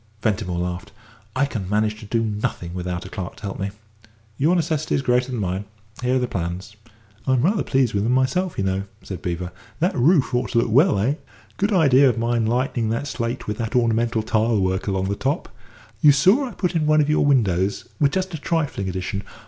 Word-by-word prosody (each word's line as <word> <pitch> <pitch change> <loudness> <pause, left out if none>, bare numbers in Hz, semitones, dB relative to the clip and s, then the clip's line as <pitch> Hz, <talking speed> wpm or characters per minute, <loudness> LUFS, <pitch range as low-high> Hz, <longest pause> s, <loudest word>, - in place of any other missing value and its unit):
Ventimore 105 -5 0
laughed. 90 +4 -4 0.4
"I 135 +2 +3
can 110 -9 -5
manage 105 +1 0
to 105 - -10
do 115 +1 +1
nothing 105 -5 -3
without 90 0 -4
a - - -8
clerk 95 -2 -6
to - - -17
help 100 -1 -5
me. 100 +1 -1 0.7
Your 155 +9 +2
necessity 155 -3 0
is 135 - 0
greater 125 0 +2
than 120 - -2
mine. 95 0 -2 0.4
Here 125 +1 +1
are - - +4
the 125 -1 0
plans." 95 +2 -4 0.5
"I'm 130 -1 +3
rather 200 +5 +2
pleased 130 -4 +1
with 100 0 +1
'em 115 - +1
myself, 130 +8 +1
you - - 0
know," 95 +1 -1 0.2
said 95 -4 -7
Beevor; 90 0 -3 0.3
"that 175 +4 +1
roof 140 +2 +3
ought 125 - 0
to - - +2
look 115 -1 +2
well, 140 - +5
eh? 125 +10 +1 0.4
Good 200 +2 +1
idea 140 -7 +5
of 120 - -1
mine 115 -1 +1
lightening 120 -1 0
the 115 +4 -1
slate 120 -3 -3
with 105 0 -4
that 115 +1 -3
ornamental 115 -1 +2
tile 110 0 +1
work 95 +1 0
along 95 -1 0
the 100 - -1
top. 140 - -2 0.5
You 150 - +8
saw 190 - +4
I 240 - -8
put 180 -3 -2
in 155 -2 +1
one 155 0 +5
of 145 - +1
your 150 - +3
windows 100 -9 +1
with 145 -3 +3
just 190 -1 -1
a 160 - -4
trifling 150 - -1
addition. 95 +2 -3
115 Hz, 215 wpm, -22 LUFS, 100-140 Hz, 0.7 s, You